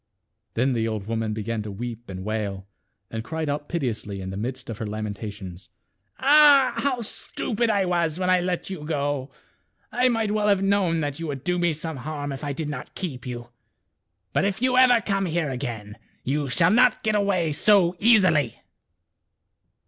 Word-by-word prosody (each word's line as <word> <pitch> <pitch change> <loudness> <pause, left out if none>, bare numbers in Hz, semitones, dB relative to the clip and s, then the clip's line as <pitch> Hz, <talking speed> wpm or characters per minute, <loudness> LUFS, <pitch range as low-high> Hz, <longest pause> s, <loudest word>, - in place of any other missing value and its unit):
Then 130 +3 +2
the 115 -1 0
old 110 -3 -3
woman 110 0 -2
began 110 +1 -3
to 105 - -6
weep 120 +2 -6
and 95 0 -6
wail, 105 -3 -3 0.5
and 115 - -5
m/ - - -2
cried 160 +5 -4
out 145 +1 -3
piteously 115 - -3
in 95 0 -5
^ - - -5
the - - -6
midst 125 +5 -4
of 110 - -7
her 110 - -3
lamenta 105 0 -4
tions, 95 -2 -10 0.3
" 95 +1 -47
Ah! 285 -1 +6
how 265 -4 0
stupid 230 +1 -2
I 200 -3 +2
was 170 -3 0
when 180 0 -1
I 185 0 +4
let 180 0 -2
you 175 -6 -6
go. 145 -3 -2 0.6
I 250 +1 +3
might 225 -3 0
well 210 0 +1
have 200 -2 +3
known 195 -5 +2
that 145 0 -3
you 165 - -4
would 140 -3 -5
do 180 0 0
me 175 -1 +2
some 160 0 -4
harm 145 +1 -5
if 135 +2 -6
I 145 - -2
did 150 +2 -3
not 150 - -7
keep 140 -9 -5
you. 120 -1 -6 0.8
But - - +2
if 200 0 0
you 255 +1 +2
ever 250 -2 +6
come 195 -2 0
here 160 -3 -1
again, 115 -5 -5 0.2
you 140 +1 -1
shall 165 +7 +3
not 245 +1 +4
get 215 - +1
away 200 -6 +1
so 185 +1 +4
easily." 185 - +4
150 Hz, 195 wpm, -25 LUFS, -, 0.8 s, Ah